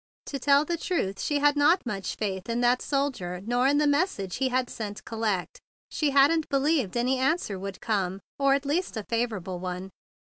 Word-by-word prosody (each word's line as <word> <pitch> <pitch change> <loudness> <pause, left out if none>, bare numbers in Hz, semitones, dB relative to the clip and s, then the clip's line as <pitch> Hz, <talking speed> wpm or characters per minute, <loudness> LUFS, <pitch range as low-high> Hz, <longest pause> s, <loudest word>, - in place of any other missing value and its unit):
To 275 - -5
tell 280 +2 +4
the 340 +2 -1
truth, 200 - -2
she 295 - 0
had 290 0 +3
not 295 +5 +4
had - - -33
much 200 -5 -3
faith 195 -1 -3
in 235 +1 0
that 245 +1 +3
soldier 265 -11 -2
nor 245 +3 +2
in 285 +1 +3
the 300 - +3
message 285 - 0
he 265 0 +1
had 255 0 0
sent 210 -3 -6
"collect." 220 -5 -2 0.3
She 300 - +1
hadn't 285 +3 +4
believed 275 - +1
any 255 +2 +1
answer 260 - 0
would 195 +1 -6
come, 195 -4 -1 0.2
or 275 0 +4
at 280 0 -3
least 300 -1 -1
any 215 - -4
favorable 215 -6 -2
one. 185 +1 -5
250 Hz, 195 wpm, -27 LUFS, 200-285 Hz, 0.3 s, tell